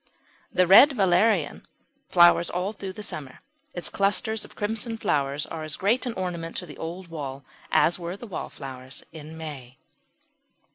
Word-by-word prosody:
The 185 - +3
Red 215 - +8
Valerian 190 - +2 0.4
flowers 175 -1 +6
all 180 +4 -2
through 195 -2 -6
the 210 - -7
summer. 140 -9 -7 0.4
Its 175 - -1
clusters 210 +2 +1
of - - -12
crimson 225 +2 -3
flowers 140 -6 0
are 160 - -6
as 155 -1 -4
great 230 +7 +1
an 240 - -2
ornament 175 -4 -4
to 180 - -4
the 150 - -11
old 170 +2 -6
wall 140 -4 -6 0.3
as 175 - +3
were 175 +2 -5
the 240 - -9
wallflowers 135 - -7
in 160 0 -10
May. 135 -6 -8
175 Hz, 155 wpm, -26 LUFS, 150-200 Hz, 0.4 s, Red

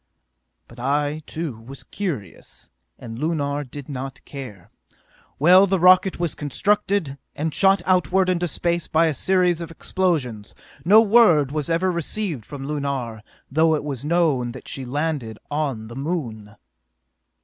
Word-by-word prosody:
"But 120 - -15
I, 145 +4 -1
too, 155 -8 -5
was 125 +3 -10
curious, 140 - -6 0.3
and 115 0 -9
Lunar 145 -2 -1
did 140 +1 -10
not 135 -1 -7
care. 125 -11 -10 0.7
Well, 180 +6 +6
the 190 0 +1
rocket 185 +1 +5
was 170 -4 0
constructed, 185 0 -1 0.2
and 155 +1 -2
shot 195 +3 +3
outward 185 0 +2
into 175 -1 0
space 170 +1 -1
by 160 +1 +3
a 160 - +1
series 180 +2 +1
of 165 - -6
explosions. 155 - -2 0.3
No 210 +6 +7
word 200 - +5
was 150 0 -2
ever 175 +3 +1
received 170 - -3
from 140 -2 -7
Lunar, 140 -6 -3 0.3
though 160 +2 +3
it 150 - -3
was 140 -4 -5
known 150 -7 +1
that 130 - -11
she 135 - -5
landed 140 -4 -3
on 140 -7 -2
the 115 +2 -10
Moon! 125 -9 -4
150 Hz, 145 wpm, -22 LUFS, 130-175 Hz, 0.7 s, No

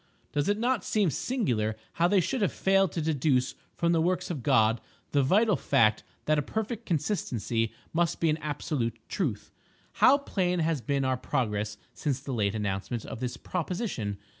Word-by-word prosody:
Does 145 +5 0
it 205 - +2
not 240 -2 +1
seem 205 -7 +2
singular 125 - 0 0.3
how 170 - +6
they 195 0 +4
should 250 +7 -1
have 200 - +2
failed 195 -2 +2
to 165 - -2
deduce 140 -4 +1 0.2
from 170 -1 +1
the 165 -1 +3
works 180 +1 0
of 150 -7 -4
God 110 0 +3 0.3
the 145 - +3
vital 205 - +4
fact 110 -10 +3 0.2
that 155 0 +3
a - - +2
perfect 220 - -4
consistency 120 - -1 0.2
must 170 0 +1
be 165 -2 +3
an 155 - 0
absolute 145 -6 -2
truth! 135 - -2 0.4
How 275 - +6
plain 185 -10 -1
has 160 -4 0
been 140 0 0
our 130 -1 +1
progress 105 -4 -1 0.2
since 140 -3 -2
the 135 0 -5
late 105 -3 0
announcement 105 +2 -2
of - - -7
this 125 0 -3
proposition! 175 - -3
150 Hz, 175 wpm, -28 LUFS, 120-185 Hz, 0.4 s, how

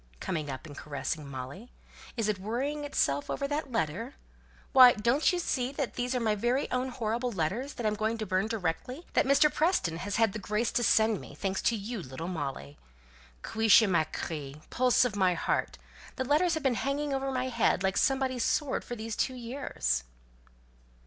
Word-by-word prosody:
coming 155 -5 -3
up 135 +3 -6
and 145 -2 -10
caressing 145 +1 -4
Molly. 135 - -7 0.5
"Is 225 -2 0
it 210 -3 0
worrying 265 +9 -2
itself 145 - 0
over 280 - -2
that 290 -1 -3
letter? 225 - -2 0.6
Why, 255 -2 +9
don't 235 - +2
you 360 - -1
see 260 -7 -1
these 255 -2 -2
are - - +1
my 220 -2 +1
very 240 +6 0
own 255 +1 0
horrible 240 0 -2
letters, 210 - -2
that 240 - -4
I - - +4
am - - -2
going 220 +2 -1
to 220 - -3
burn 185 +2 0
directly, 225 - -3
that - - +3
Mr. 280 +2 +5
Preston 310 - +1
has 200 +4 -3
had 225 -3 +3
the 215 - -4
grace 210 +4 -1
to 240 - +1
send 220 -1 +3
me, - - -11
thanks 195 -1 -2
to 235 - +2
you, 215 +1 -5
little 145 +3 -7
Molly 135 - -5 0.6
cuishla 220 -1 +5
ma 165 -3 +3
chree, 150 -3 -5
pulse 250 0 +4
of 230 -4 -2
my 185 -3 +3
heart, - - -1 0.4
the 260 - -2
letters 320 +6 +3
that 315 - -2
have - - -14
been 265 -2 +3
hanging 280 +1 -1
over 270 0 -1
my 260 0 -1
head 230 -6 +1
like 190 0 +1
somebody's 265 -3 +1
sword 290 -4 0
for 240 - -6
these 220 -1 -5
two 260 - -1
years?" 230 - -2
225 Hz, 195 wpm, -29 LUFS, 185-260 Hz, 0.6 s, Why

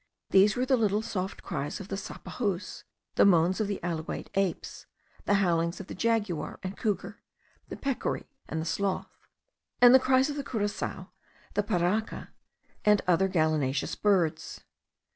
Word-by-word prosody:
These 200 +2 +5
were 250 +1 0
the 260 0 +3
little 215 -1 +1
soft 195 -4 -4
cries 145 +6 -4
of 195 0 -9
the 195 - -2
sapajous, 200 0 -4 0.3
the - - +4
moans 185 +1 +4
of 215 - 0
the 200 - -3
alouate 165 -2 -4
apes, 195 -3 -2 0.4
the 205 - +3
howlings 170 -3 +1
of 195 - -7
the - - -8
jaguar 205 -9 -1
and 185 +1 -4
couguar, 205 0 -2 0.5
the - - -6
peccary, 275 -2 -2 0.2
and 160 - -2
the 160 - -3
sloth, 190 +3 -2 0.6
and 245 0 +8
the 260 - +9
cries 260 +1 +3
of 295 -1 -4
the 285 - -2
curassao, 205 -5 -3 0.4
the 205 - +2
parraka, 200 +2 -1 0.5
and 210 -1 +4
other 185 +2 +4
gallinaceous 155 -6 0
birds. 185 -6 0
195 Hz, 155 wpm, -28 LUFS, 170-215 Hz, 0.6 s, the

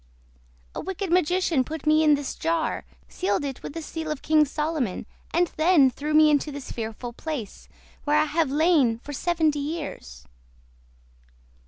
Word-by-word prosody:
A - - -4
wicked 385 -1 -4
magician 355 -4 +2
put 310 +3 -7
me 310 +1 +4
in 300 -1 +5
this 285 -2 -4
jar, 330 -1 -1 0.2
sealed 365 -5 -1
it 270 -2 -5
with - - -7
the 330 0 -5
seal 320 0 -5
of 305 -3 -4
King 310 -1 +4
Solomon, 300 - -2 0.3
and 345 0 +1
then 310 -5 +5
threw 300 +4 -3
me 310 0 +7
into 295 +1 +1
this 280 -2 -7
fearful 230 +1 -5
place, 265 -6 -6 0.3
where 295 0 +2
I - - +4
have 310 -1 0
lain 290 -6 +3
for 290 +5 -9
seventy 315 -1 +1
years." 290 - -6
305 Hz, 160 wpm, -25 LUFS, 280-325 Hz, 0.3 s, me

